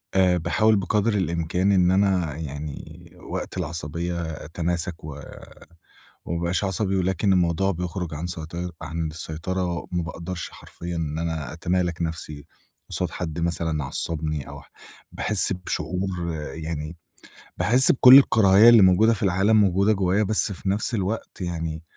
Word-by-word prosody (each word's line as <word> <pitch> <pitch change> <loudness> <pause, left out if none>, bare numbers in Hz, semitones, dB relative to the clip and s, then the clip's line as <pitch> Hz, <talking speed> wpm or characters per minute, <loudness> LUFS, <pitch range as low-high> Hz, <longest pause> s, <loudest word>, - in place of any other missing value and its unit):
آآ، 90 -2 +4
باحاول 110 +6 +2
بقدر 105 +3 0
الإمكان 90 +2 0
إن 90 -2 +4
أنا 95 -6 +1
يعني 75 -1 -8 0.2
وقت - - -5
العصبية 85 +2 -3 0.2
أتماسك 85 +1 -3
و 75 -2 -8 1.0
وما 85 0 -3
ابقاش 85 +3 -1
عصبي، 95 0 -1
ولكن 95 +1 +1
الموضوع 90 +1 +1
بيخرج 90 -1 -4
عن 80 +4 -4
سيطي 85 +1 -5
عن 80 +1 -3
السيطرة، 85 +3 -4
ما 90 -1 -1
باقدرش 85 +1 -6
حرفيًا 85 0 -8
إن 80 -2 -3
أنا 80 -3 -4
أتمالك 85 0 -1
نفْسي 80 -3 -5 0.4
قصاد - - -2
حد 85 -2 -5
مثلًا 85 -2 -1
عصّبني 75 +1 -3
أو 70 0 -9
ح 65 - -23 0.4
باحس 105 -3 +1
بشعور 90 -1 -3 0.2
يعني 80 0 -5 0.6
باحس 125 +4 +6
بكل 130 0 +9
الكراهية 110 -4 +6
اللي 115 -2 +7
موجودة 95 +5 +5
في 105 - -4
العالم 100 +3 +3
موجودة 100 +2 +3
جوّايا، 95 +1 +1
بس 105 0 +1
في 95 0 -4
نفس 105 +5 -1
الوقت 100 +1 -4
يعني 80 -2 -4
90 Hz, 140 wpm, -24 LUFS, 80-95 Hz, 1.0 s, بكل